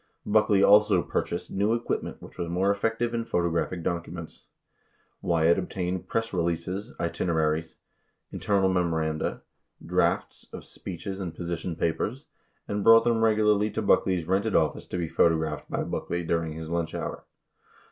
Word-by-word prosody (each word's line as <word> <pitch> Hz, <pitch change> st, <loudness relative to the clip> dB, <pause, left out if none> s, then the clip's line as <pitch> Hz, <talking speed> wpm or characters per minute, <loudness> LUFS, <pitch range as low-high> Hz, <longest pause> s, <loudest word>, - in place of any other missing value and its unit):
Buck 105 Hz, +1 st, +3 dB
ley 100 Hz, -2 st, +4 dB
also 105 Hz, +1 st, +6 dB
purchased -, -, -3 dB
new 105 Hz, +4 st, +1 dB
equipment 120 Hz, -, -3 dB
which -, -, -13 dB
was 85 Hz, -1 st, -2 dB
more 95 Hz, +3 st, +2 dB
effective 115 Hz, +3 st, -1 dB
in 115 Hz, 0 st, -1 dB
photo 85 Hz, -6 st, 0 dB
graphing 85 Hz, +1 st, -2 dB
documents. 85 Hz, -1 st, -5 dB, 0.7 s
18 -, -, -6 dB
Wyatt 85 Hz, +1 st, +4 dB
obtained 90 Hz, -1 st, -3 dB
press 115 Hz, -1 st, -2 dB
releases, 85 Hz, +3 st, -2 dB
itineraries, 80 Hz, -2 st, -1 dB, 0.6 s
inter 100 Hz, -1 st, 0 dB
nal 95 Hz, -, +3 dB
memoranda, 80 Hz, -4 st, -1 dB, 0.4 s
drafts -, -, 0 dB
of -, -, -9 dB
speeches 95 Hz, +2 st, -7 dB
and 85 Hz, -4 st, -5 dB
position 85 Hz, 0 st, -4 dB
papers, 105 Hz, -, -2 dB, 0.4 s
and 100 Hz, 0 st, -2 dB
brought 115 Hz, +1 st, +8 dB
them 115 Hz, -1 st, +2 dB
regularly 105 Hz, -1 st, +3 dB
to -, -, -3 dB
Buckley's 90 Hz, -3 st, +2 dB
rented 100 Hz, +4 st, 0 dB
office 80 Hz, -2 st, +1 dB
to -, -, -4 dB
be 85 Hz, -2 st, -1 dB
photographed 80 Hz, -2 st, +1 dB
by -, -, -1 dB
Buck -, -, -4 dB
ley 85 Hz, 0 st, -1 dB
during 80 Hz, -1 st, -1 dB
his 80 Hz, +1 st, -7 dB
lunch 85 Hz, -1 st, -2 dB
hour. -, -, -5 dB
90 Hz, 155 wpm, -27 LUFS, 85-105 Hz, 0.7 s, brought